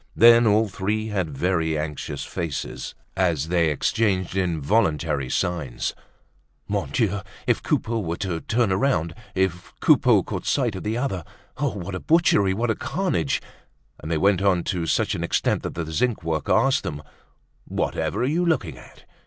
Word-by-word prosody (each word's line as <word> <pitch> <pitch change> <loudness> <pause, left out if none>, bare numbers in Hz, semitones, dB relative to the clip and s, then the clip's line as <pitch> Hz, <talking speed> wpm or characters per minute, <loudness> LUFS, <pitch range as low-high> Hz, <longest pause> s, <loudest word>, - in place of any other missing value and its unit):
Then 115 0 +7
all 110 +1 +4
three 105 +3 -2
had 95 -6 -1
very 80 -3 +1
anxious 75 -1 -4
faces 80 -5 -4 0.2
as 85 -5 +1
they 85 -2 +3
exchanged 95 +4 0
involuntary 80 - +1
signs. 80 -7 -1 0.7
Mon - - -2
Dieu! 100 - 0 0.3
if - - +1
Coupeau 115 0 0
were 85 -4 -3
to 90 -5 -2
turn 115 -3 +1
round, 95 - +1 0.2
if 95 -2 -1
Coupeau - - +5
caught - - -5
sight 125 -6 +1
of 95 - -5
the 110 +2 -2
other! 110 - -2 0.4
What 100 -9 -2
a 95 - -3
butchery! 160 - +3
What 110 +3 -1
carnage! 170 - -1 0.6
And 75 - -7
they 85 - +1
went 100 +3 +3
on 95 -3 +2
to 85 -2 -2
such - - +1
an - - -3
extent - - +1
that - - -5
the 80 -1 -4
zinc 110 +3 0
worker 80 -2 -1
asked 135 +1 +3
them: 75 -1 -5 0.6
"Whatever - - -1
are - - +3
you 160 +6 +1
looking 95 - 0
at?" - - -16
95 Hz, 160 wpm, -24 LUFS, 80-110 Hz, 0.7 s, Then